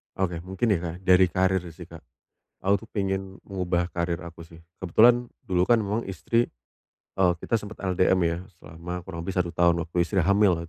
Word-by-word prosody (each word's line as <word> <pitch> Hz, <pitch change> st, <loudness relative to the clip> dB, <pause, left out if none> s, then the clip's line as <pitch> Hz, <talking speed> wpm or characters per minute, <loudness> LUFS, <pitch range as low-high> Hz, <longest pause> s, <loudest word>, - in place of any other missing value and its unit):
Oke. 90 Hz, -3 st, -1 dB
Mungkin 95 Hz, +6 st, -2 dB
ya, 95 Hz, -, +2 dB
Kak, 85 Hz, -1 st, -5 dB
dari 90 Hz, 0 st, +5 dB
karir 95 Hz, 0 st, +1 dB
sih, -, -, -9 dB
Kak. -, -, -12 dB, 0.6 s
Aku 100 Hz, +1 st, +2 dB
tuh -, -, -40 dB
pengen 95 Hz, -2 st, -3 dB
mengubah 90 Hz, -3 st, -1 dB
karir 85 Hz, -1 st, -1 dB
aku 85 Hz, 0 st, -10 dB
sih. 80 Hz, 0 st, -15 dB, 0.2 s
Kebetulan 120 Hz, +7 st, +4 dB, 0.2 s
dulu 90 Hz, -1 st, +1 dB
kan 120 Hz, -1 st, +5 dB
memang 105 Hz, +2 st, -1 dB
istri 115 Hz, +5 st, 0 dB, 0.7 s
eee, 90 Hz, -2 st, +4 dB
kita 115 Hz, -, +1 dB
sempet 105 Hz, 0 st, -10 dB
LDM 95 Hz, 0 st, +2 dB
ya, 85 Hz, 0 st, 0 dB, 0.2 s
selama 85 Hz, +3 st, -7 dB
kurang 85 Hz, -2 st, -7 dB
lebih 95 Hz, -, -3 dB
1 90 Hz, -2 st, 0 dB
tahun 85 Hz, 0 st, +2 dB
waktu 85 Hz, +1 st, -10 dB
istri 95 Hz, 0 st, +1 dB
hamil, 100 Hz, -2 st, +3 dB
95 Hz, 185 wpm, -26 LUFS, 85-95 Hz, 0.7 s, dari